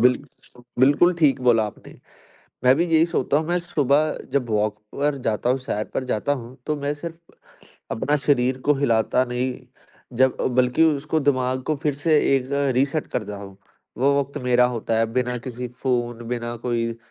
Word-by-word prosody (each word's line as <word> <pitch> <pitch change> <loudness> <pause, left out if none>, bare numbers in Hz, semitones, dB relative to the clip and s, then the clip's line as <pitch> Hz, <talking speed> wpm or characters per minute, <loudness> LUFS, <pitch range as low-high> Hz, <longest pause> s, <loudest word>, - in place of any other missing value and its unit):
Bill 125 +1 +5 0.6
बिल्कुल 145 +7 +5
ठीक 140 -5 +3
बोला 115 -3 +4
आपने। 105 - -12 0.7
मैं 130 +1 +7
भी 170 - +2
यही 165 0 +4
सोता 155 - 0
हूँ, 155 +1 0
मैं 175 +1 +1
सुबह 150 -2 +1
जब 135 -4 0
वॉक 105 -1 0 0.2
पर 145 +1 0
जाता 110 +2 0
हूँ, 130 - +2
सैर 110 -5 -3
पर 130 - -1
जाता 125 +3 -1
हूँ 120 +3 -12
तो 150 -1 0
मैं 145 0 -2
सिर्फ़ 165 +2 -10 0.6
अपना 130 +6 0
शरीर 130 -3 +1
को 150 - +5
हिलाता 125 -2 +2
नहीं, 125 +1 -2 0.6
जब 130 0 +3 0.2
बल्कि 125 +5 +3
उसको 155 0 +1
दिमाग 130 -2 +1
को 155 - -1
फिर 150 -2 +1
से 155 +2 +2 0.2
एक 130 -2 -1
ज़ 135 - -6 0.2
रीसेट 140 +4 0
कर 115 - -2
जा 105 0 -7
हूँ। 100 -1 -10 0.4
वो 140 +2 +3
वक़्त 140 0 -4
मेरा 125 0 +4
होता 115 -2 -1
है 115 - +3
बिना 125 0 0
किसी 125 0 -6
फ़ोन, 120 -1 -2
बिना 120 0 -3
कोई 115 -1 -2
130 Hz, 180 wpm, -23 LUFS, 120-145 Hz, 0.7 s, मैं